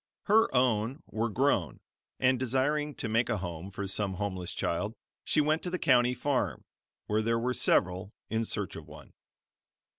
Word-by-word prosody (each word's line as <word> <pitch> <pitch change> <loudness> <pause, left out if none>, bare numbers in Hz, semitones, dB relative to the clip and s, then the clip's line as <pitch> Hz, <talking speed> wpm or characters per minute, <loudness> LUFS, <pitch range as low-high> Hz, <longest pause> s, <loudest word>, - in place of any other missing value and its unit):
Her 220 +2 +4
own 125 +2 +1
were 115 +2 -2
grown, 115 - +1 0.4
and 130 -1 +3
desiring 140 +4 0
to - - -3
make 115 +2 +1
a - - +1
home 90 -1 -5
for 100 0 -5
some 95 0 -1
homeless 95 -3 -3
child, 105 +6 -2 0.3
she 155 - +2
went 155 +2 +1
to 180 - -3
the 180 - -1
county 125 -5 +4
farm, 135 +1 -1 0.4
where 105 +1 +1
there 115 +1 +1
were 125 +2 0
several, 95 -3 +1 0.2
in 110 0 0
search - - -4
of - - -9
one. - - -13
115 Hz, 170 wpm, -30 LUFS, 100-130 Hz, 0.4 s, Her